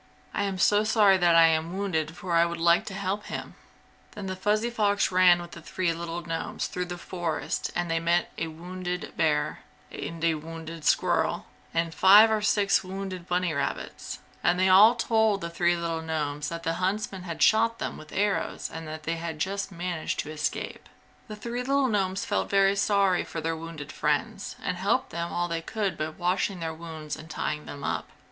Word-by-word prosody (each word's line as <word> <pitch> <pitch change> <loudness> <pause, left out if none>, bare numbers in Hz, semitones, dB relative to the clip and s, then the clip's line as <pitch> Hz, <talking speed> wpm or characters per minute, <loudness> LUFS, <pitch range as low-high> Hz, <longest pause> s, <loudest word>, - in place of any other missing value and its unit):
"I 200 - 0
am 195 -1 -2
sorry 210 0 +4
that 175 -2 +4
I 165 0 +8
am 165 +3 +1
wounded 165 -5 -2
for 185 -3 -4
I 170 0 +6
would 170 0 -2
like 170 +1 +4
to 195 - -5
help 195 +2 -2
him!" - - -6 0.6
Then 195 -2 -5
Fuzzy 210 +5 0
Fox 205 -4 +1
ran 180 -1 +6
with 175 0 -8
the 170 - -10
three 170 +1 -1
little 170 +1 -5
gnomes 165 -1 -3
through 180 - -3
the 175 0 -6
forest 175 -3 -3
and 175 -1 -1
they 165 - +2
met 170 +1 +1
a 165 - -2
wounded 180 +2 -5
bear, 150 -2 +1 0.3
and 165 0 -6
a 165 -1 +4
wounded 160 0 -7
squirrel, - - +2 0.3
and 165 0 -1
five 205 +5 +8
or 215 -1 +1
six 205 -2 +3
wounded 185 -1 -6
bunny 180 -1 0
rabbits, 140 - -4 0.3
and 180 +1 +3
they 185 - +4
all 210 +6 +8
told 220 -4 +2
the 170 - -4
three 175 0 +2
little 165 -1 -2
gnomes 150 -2 -2
that 170 0 -6
the 165 -1 0
huntsmen 195 0 -1
had 170 -3 -2
shot 230 +1 +4
them - - -4
with 155 - -12
arrows 205 0 -1
and 160 0 -6
that 155 0 -7
they 165 0 -3
just 195 +4 -2
managed 175 -2 -3
to 155 - -8
escape. 150 -1 -4 0.4
The 215 - -7
three 235 +3 -5
little 275 +1 +2
gnomes 195 -4 0
felt - - -1
very 195 0 +4
sorry 200 -2 +2
for 165 - -6
their 165 +1 -1
wounded 160 -3 -8
friends - - -1
and - - -2
helped - - 0
them 170 +1 -3
all 175 0 -1
they 165 -1 -2
could 200 0 -2
by 155 0 -2
washing 180 +3 -1
their 165 -1 -3
wounds 160 -2 -7
and 160 - -11
tying 150 -1 -3
them 140 -1 -8
up. - - -2
175 Hz, 195 wpm, -27 LUFS, 165-195 Hz, 0.6 s, I